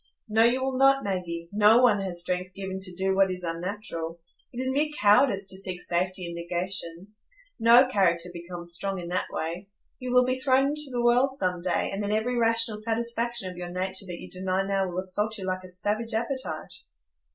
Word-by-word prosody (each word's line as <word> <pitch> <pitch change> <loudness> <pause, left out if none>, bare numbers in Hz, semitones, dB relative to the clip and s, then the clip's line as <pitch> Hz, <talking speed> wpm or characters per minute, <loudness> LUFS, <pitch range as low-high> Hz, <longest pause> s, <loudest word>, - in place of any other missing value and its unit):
"No, 220 +1 +4
you 250 +3 +3
will 265 -1 -1
not, 270 0 +5
Maggie; 175 -4 -3
no 215 +4 +5
one 210 -5 +4
has 180 -3 0
strength 180 +1 -3
given 190 -1 -5
to 185 -2 -4
do 190 +1 0
what 195 0 +4
is 180 -1 -5
unnatural. 170 -1 -4 0.3
It 245 - -7
is 260 0 0
mere 295 +3 +1
cowardice 205 -1 +4
to 190 - -3
seek 185 -2 -4
safety 180 +1 -1
in 170 - -6
negations. 175 +3 -4 0.3
No 235 +3 +7
character 180 -8 +1
becomes 170 0 -3
strong 195 +2 -2
in 170 -1 -6
that 180 +1 -1
way. 175 +5 -4 0.3
You 250 -1 -4
will 250 0 +5
be 255 +1 -1
thrown 265 +1 +3
into 300 -1 +2
the 240 -1 -1
world 250 +3 +3
some 180 -4 -1
day, 180 -1 0
and 195 - -3
then 205 0 -2
every 220 +4 0
rational 230 -2 +1
satisfaction 235 -2 -2
of 180 - -12
your 175 0 -6
nature 190 +2 -2
that 175 -1 -6
you - - -9
deny 185 +1 -1
now 195 -1 0
will 175 - -6
assault 210 +4 -2
you 190 - -6
like 185 0 -2
a 185 - -10
savage 215 +5 -2
appetite." 260 +4 -3
195 Hz, 205 wpm, -27 LUFS, 180-235 Hz, 0.3 s, No